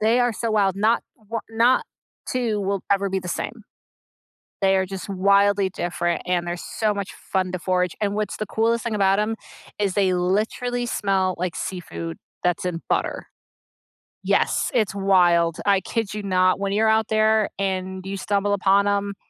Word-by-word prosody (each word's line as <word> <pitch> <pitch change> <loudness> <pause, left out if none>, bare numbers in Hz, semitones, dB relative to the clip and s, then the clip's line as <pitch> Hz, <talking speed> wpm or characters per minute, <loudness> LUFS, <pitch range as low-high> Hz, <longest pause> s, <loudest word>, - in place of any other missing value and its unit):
They 225 +3 +3
are 245 -1 +2
so 230 +2 -2
wild, 200 -3 +2
not 220 +4 +2
1 225 -1 -6
not 230 +3 +3 0.4
2 235 -5 0
will 195 -1 -1
ever 200 0 +2
be 190 0 -1
the 180 -1 -7
same. 220 +4 -4 1.0
They 195 0 +4
are 190 0 +2
just 190 +1 -7
wildly 200 0 +3
different, 175 -2 -2
and 180 -1 +1
they're 175 0 -3
so 215 +4 -1
much 200 -1 -5
fun 185 -1 -2
to 185 - -2
forage, 180 -1 0
and 205 -1 0
what's 210 -1 -2
the 215 - -3
coolest 230 +2 0
thing 230 -2 -2
about 195 -1 +3
'em 215 +1 0 0.4
is 200 -3 +1
they 195 -3 +2
literally 215 +7 0
smell 190 -5 0
like 180 0 -3
seafood 85 - -5 0.3
that's 180 0 0
in 170 -2 -2
butter. - - -1 1.0
Yes, - - +1
it's 215 -5 +1
wild. 175 -4 +3
I 200 -1 +4
kid 220 +1 -3
you 210 - -5
not 185 -1 +2
when 200 0 -1
you're 220 +2 +3
out 220 0 +3
there, 220 -1 +3
and 190 -1 -2
you 195 +1 -4
stumble 205 +1 0
upon 200 0 +3
'em 200 0 0
200 Hz, 175 wpm, -23 LUFS, 185-215 Hz, 1.0 s, They